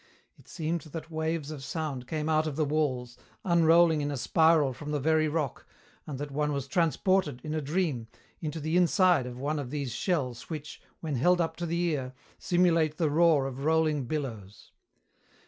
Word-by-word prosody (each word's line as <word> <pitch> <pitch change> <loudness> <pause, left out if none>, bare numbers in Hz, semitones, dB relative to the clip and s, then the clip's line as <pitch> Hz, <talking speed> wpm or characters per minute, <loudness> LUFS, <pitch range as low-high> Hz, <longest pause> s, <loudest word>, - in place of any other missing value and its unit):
It - - -22
seemed 165 0 -3
that 160 +1 -8
waves 160 -1 -2
of 145 -3 -7
sound 140 -5 -4
came 155 +1 -2
out 155 0 +2
of 150 - -3
the 155 0 +1
walls, 130 -5 -1 0.3
unrolling 170 -2 +5
in 145 - -1
a 145 - -3
spiral 160 0 +3
from 150 +4 -8
the 150 -1 0
very 155 +2 +2
rock, 150 -4 -3 0.4
and 145 -3 -5
that 145 +1 -5
one 150 +1 0
was 140 -2 -3
transported, 170 -2 +1
in 155 - -4
a 155 - -1
dream, 145 -6 -1 0.3
into 155 0 -4
the 155 +3 0
inside 180 - +4
of 125 -1 -7
one 145 +4 -2
of 135 -4 -5
these 140 -4 -3
shells 130 - -2
which, 155 -2 -7 0.2
when 155 -5 -2
held 175 +8 +3
up 165 -1 0
to 175 - -3
the 170 +1 -1
ear, 145 -7 -1 0.2
simulate 165 -4 +2
the 160 -4 +1
roar 160 -3 +4
of 135 0 -5
rolling 155 -3 +2
billows. 115 -9 -5
155 Hz, 185 wpm, -29 LUFS, 140-165 Hz, 0.4 s, unrolling